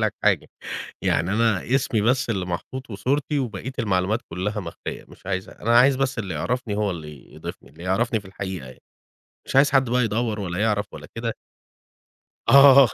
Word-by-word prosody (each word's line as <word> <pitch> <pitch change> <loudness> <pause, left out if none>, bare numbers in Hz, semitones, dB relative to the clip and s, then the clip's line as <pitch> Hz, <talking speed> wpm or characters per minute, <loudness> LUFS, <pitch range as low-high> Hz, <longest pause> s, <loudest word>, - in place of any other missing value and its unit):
لك - - +1
حاجة، - - +2 0.5
يعني 85 +5 +1
أنا 115 +2 +2
اسمي 120 -5 +1
بس 125 +3 +2
اللي 95 -5 -1
محطوط 120 +10 -5
وصورتي 135 +8 0
وبقية 120 -1 -4
المعلومات 100 0 +1
كُلّها 100 +5 -2
مخفية، 85 -4 -7
مش - - -17
عايزها، 95 -1 -4
أنا 115 +2 +5
عايز 135 +2 +6
بس 135 -2 -1
اللي 100 -4 -3
يِعرفني 125 -4 -2
هو 105 -1 0
اللي 75 -5 -9
يضيفني، - - -8
اللي 85 +3 -13
يعرفني 110 +5 +1
في 105 - -17
الحقيقة 95 -5 -5
يعني، 65 - -14 0.7
مش - - -2
عايز 140 +1 +6
حد 135 -3 +3
بقى 125 0 +3
يدوّر 110 0 -1
ولا 90 -2 -3
يِعرف 105 -1 +1
ولا - - -9
كده. 115 0 -2 1.1
آه. 135 0 +9
110 Hz, 175 wpm, -24 LUFS, 95-125 Hz, 1.1 s, آه